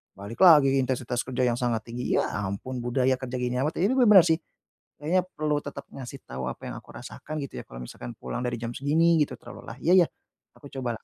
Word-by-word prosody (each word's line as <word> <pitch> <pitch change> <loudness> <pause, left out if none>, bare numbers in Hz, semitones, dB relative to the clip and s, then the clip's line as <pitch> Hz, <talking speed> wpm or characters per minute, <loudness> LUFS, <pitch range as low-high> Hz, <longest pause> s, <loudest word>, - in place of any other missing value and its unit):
balik 100 +4 -9
lagi 145 -6 +7
intensitas 125 -1 -1
kerja 130 0 -1
yang 120 - -1
sangat 120 -3 0
tinggi, 125 +1 -2
ya, - - -1 0.2
ampun, 100 +7 -5
budaya 130 +1 +2
kerja 130 -1 -5
gini 125 0 -1
amat. 150 +3 -1
Ya, 195 - +4
ini - - +2
bener 245 - +5
bener 190 -5 +9
sih, 160 0 +3 0.6
kayaknya 165 +5 +1
perlu 150 -1 0
tetap 145 - -8
ngasih 135 0 -8
tau 65 0 -5
apa - - -8
yang - - -6
aku - - -23
rasakan, 155 - -8
gitu 140 - -7
ya, - - -13
kalau - - -10
misalkan - - -8
pulang 65 - -5
dari 120 -1 -2
jam 115 0 -3
segini, 160 +4 +3
gitu, 140 -3 0
terlalu 120 - -11
lelah, 115 - -8
ya 175 - +4
ya, - - -9 0.5
aku 140 - -12
coba 125 -4 -3
lah. - - -33
130 Hz, 235 wpm, -26 LUFS, 120-150 Hz, 0.6 s, bener